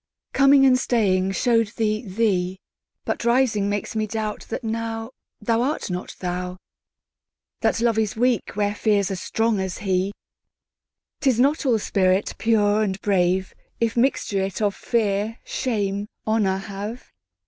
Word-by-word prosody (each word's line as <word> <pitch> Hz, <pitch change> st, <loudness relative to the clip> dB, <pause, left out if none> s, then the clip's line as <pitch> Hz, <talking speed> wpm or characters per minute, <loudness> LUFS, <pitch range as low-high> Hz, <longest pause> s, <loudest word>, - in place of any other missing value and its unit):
Coming 275 Hz, 0 st, +6 dB
and 255 Hz, -1 st, +5 dB
staying 195 Hz, -6 st, +1 dB
show'd 230 Hz, +1 st, +2 dB
thee 215 Hz, 0 st, 0 dB
thee; 190 Hz, -3 st, 0 dB, 0.5 s
But -, -, -2 dB
rising 235 Hz, -4 st, +2 dB
makes 205 Hz, +2 st, -3 dB
me 215 Hz, 0 st, 0 dB
doubt 215 Hz, 0 st, -4 dB
that 245 Hz, -, -4 dB
nowThou 225 Hz, +1 st, -3 dB, 0.5 s
art 260 Hz, -4 st, -1 dB
not 180 Hz, +1 st, -5 dB
thou. 180 Hz, 0 st, -3 dB, 1.0 s
That -, -, +1 dB
Love 230 Hz, -2 st, +2 dB
is 215 Hz, -2 st, 0 dB
weak 240 Hz, -3 st, 0 dB
where 205 Hz, 0 st, +1 dB
Fear's 205 Hz, -2 st, +1 dB
as 185 Hz, -, -4 dB
strong 225 Hz, -2 st, 0 dB
as 190 Hz, -2 st, -3 dB
he;'Tis 200 Hz, +5 st, -4 dB
not 285 Hz, +3 st, +2 dB
all 235 Hz, -3 st, +4 dB
spirit 190 Hz, -2 st, +1 dB
pure 215 Hz, -2 st, +3 dB
and 195 Hz, -2 st, -1 dB
brave, 185 Hz, -1 st, +1 dB, 0.3 s
If 230 Hz, -1 st, 0 dB
mixture 235 Hz, -5 st, +1 dB
it 190 Hz, -1 st, -3 dB
of 205 Hz, -2 st, +1 dB
Fear, 215 Hz, 0 st, 0 dB
Shame, 205 Hz, -4 st, -2 dB, 0.2 s
Honour 210 Hz, -3 st, +1 dB
have. 205 Hz, +4 st, -7 dB
210 Hz, 135 wpm, -23 LUFS, 195-230 Hz, 1.0 s, Coming